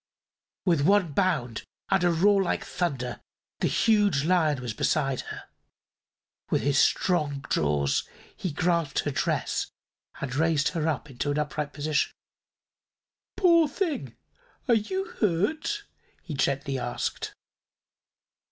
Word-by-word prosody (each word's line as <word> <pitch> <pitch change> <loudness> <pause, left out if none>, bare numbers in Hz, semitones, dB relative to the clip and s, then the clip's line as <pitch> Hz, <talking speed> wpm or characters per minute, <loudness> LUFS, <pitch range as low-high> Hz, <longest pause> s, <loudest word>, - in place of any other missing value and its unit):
With 170 -6 +3
one 185 -1 +3
bound 140 - 0 0.3
and 190 -2 +3
a 175 - +4
roar 195 +4 +4
like 185 - -1
thunder 135 -8 -3 0.4
the - - +2
huge 205 -10 +3
Lion 160 -4 +2
was 125 -3 -4
beside 135 +2 0
her. - - -7 1.1
With - - +1
his 140 -1 +3
strong 145 -7 +1
jaws 75 -2 +1 0.3
he 180 - -3
grasped 165 -1 +1
her 145 - -2
dress 135 - -1 0.5
and 135 -2 -4
raised 155 0 +2
her 160 -5 0
into 140 0 -4
an 145 - 0
upright 150 0 -2
position. 150 +1 0 1.3
"Poor 340 -4 +5
thing! 325 -1 -3 0.5
Are 245 - +5
you 375 - 0
hurt?" 305 - 0 0.4
he 175 - -6
gently 135 0 0
asked. - - -3
155 Hz, 120 wpm, -27 LUFS, 140-195 Hz, 1.3 s, Poor